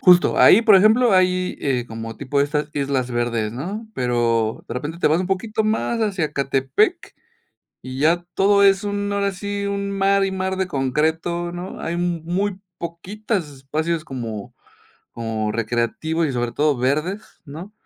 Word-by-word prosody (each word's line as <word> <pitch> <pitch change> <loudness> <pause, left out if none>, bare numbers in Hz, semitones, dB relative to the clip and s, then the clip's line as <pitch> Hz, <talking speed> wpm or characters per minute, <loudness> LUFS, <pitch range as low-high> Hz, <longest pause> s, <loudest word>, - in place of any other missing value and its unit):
justo, 180 -1 +5
ahí, 225 - +7
por 215 -4 +7
ejemplo, 220 +4 +5
hay, 185 0 +2
eh, 125 -4 0
como 115 0 -7
tipo 140 +1 -1
estas 150 +1 0
Islas 135 -3 -1
Verdes, 120 -3 -1
¿no?, 195 - -5
pero, 115 -3 0
de 115 - -6
repente 150 +6 -5
te - - +2
vas 160 +3 +2
un 185 - -2
poquito 210 +4 -1
más 220 +2 0
hacia 195 -7 0
Ecatepec, 135 -2 0 0.7
y 130 +1 -7
ya 170 +4 +2
todo 200 +1 +4
es 195 0 +4
un 205 0 -2
ahora 200 0 0
sí, 200 +1 -4
un 200 0 -2
mar 195 0 +2
y 195 - -2
mar 190 0 -2
de 190 -1 0
concreto, 160 +5 -1
¿no?, 175 +2 -7
hay 170 - -3
mu 175 -1 -1
muy 190 +3 -1 0.2
poquitas 180 +1 -4
espacios 155 +4 -3
como 115 -6 -6 0.6
como 110 -2 -3
recreativos, 120 +9 -1
y 140 - -2
sobre 120 -1 -2
todo 150 -1 +1
verdes, 150 - -1 0.2
¿no?, 165 +8 -9
165 Hz, 165 wpm, -21 LUFS, 130-195 Hz, 0.7 s, ahí